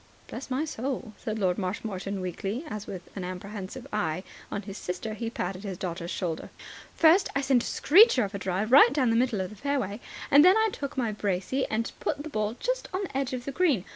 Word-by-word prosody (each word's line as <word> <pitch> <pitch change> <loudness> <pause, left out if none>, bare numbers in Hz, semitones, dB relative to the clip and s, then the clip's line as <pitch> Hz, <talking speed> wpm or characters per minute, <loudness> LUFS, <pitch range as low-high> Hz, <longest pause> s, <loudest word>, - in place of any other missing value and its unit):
("Bless 255 +3 -7
my 265 +4 0
soul," 255 -5 -4
said 220 -1 -3
Lord 185 -3 +1
Marshmoreton 195 0 -3
weakly, 195 - -3
as, 210 -6 -6
with 180 -2 -8
an 190 - -4
apprehensive 195 +5 -6
eye 180 -4 -1 0.3
on 205 - -3
his 195 0 -8
sister, 180 +3 -4
he 225 +1 -3
patted 185 -4 -4
his 195 -3 -5
daughter's 170 -1 -4
shoulder.) 170 -4 -3 0.5
"First, 330 +4 +5
I 280 - +2
sent 265 -3 +3
a - - -4
screecher 345 - +6
of 200 0 -4
a 200 - -3
drive 190 +4 -1
right 260 -2 +9
down 260 -5 +2
the - - +2
middle 235 -4 +2
of 185 - -4
the - - -10
fairway. 240 -4 -2 0.3
Then 290 +5 +8
I 440 0 +3
took 280 -1 -5
my 235 -4 +1
brassey 205 +5 -1
and 225 +1 -1
put 290 -1 -2
the 310 - -7
ball 215 0 -1
just - - -1
on 375 +2 -2
the 355 - -7
edge 270 -1 -1
of 250 -1 -4
the 275 - -3
green. 280 - +2
220 Hz, 220 wpm, -28 LUFS, 190-270 Hz, 0.5 s, right